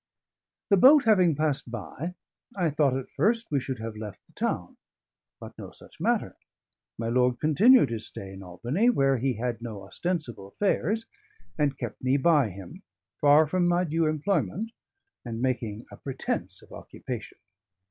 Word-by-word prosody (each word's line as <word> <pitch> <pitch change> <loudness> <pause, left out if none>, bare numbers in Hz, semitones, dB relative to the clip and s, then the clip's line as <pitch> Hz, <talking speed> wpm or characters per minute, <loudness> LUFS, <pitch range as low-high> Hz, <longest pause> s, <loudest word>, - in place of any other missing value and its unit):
The 200 - +5
boat 275 +8 +8
having 185 -8 +4
passed 150 -4 -1
by, 120 - -6 0.4
I 175 -5 +1
thought 140 -3 +2
at 135 - -7
first 230 -1 +1
we 140 - +2
should 130 0 -4
have 110 0 -6
left 105 -3 -8
the - - -28
town. - - -3 0.6
But - - -10
no - - -7
such - - -15
matter. - - 0 0.6
My 115 - -3
lord 125 +1 +2
continued 205 - +5
his 110 -2 -3
stay 95 -1 -8
in 95 - -10
Albany, 120 - 0
where 135 - +2
he 130 +2 0
had 120 +1 -3
no 110 -4 -7
ostensible 120 - -4
affairs, 205 - 0 0.5
and 145 -2 0
kept - - -6
me 130 +2 +3
by 145 -4 +3
him, 95 -1 -10 0.4
far 150 +2 +6
from 175 +3 +1
my 175 +1 +2
due 165 -1 0
employment, 160 - -1 0.5
and 115 -2 -5
making 120 -4 -2
a - - -11
pretence 135 -2 -4
of - - -19
occupation. - - -8
140 Hz, 160 wpm, -27 LUFS, 115-175 Hz, 0.6 s, boat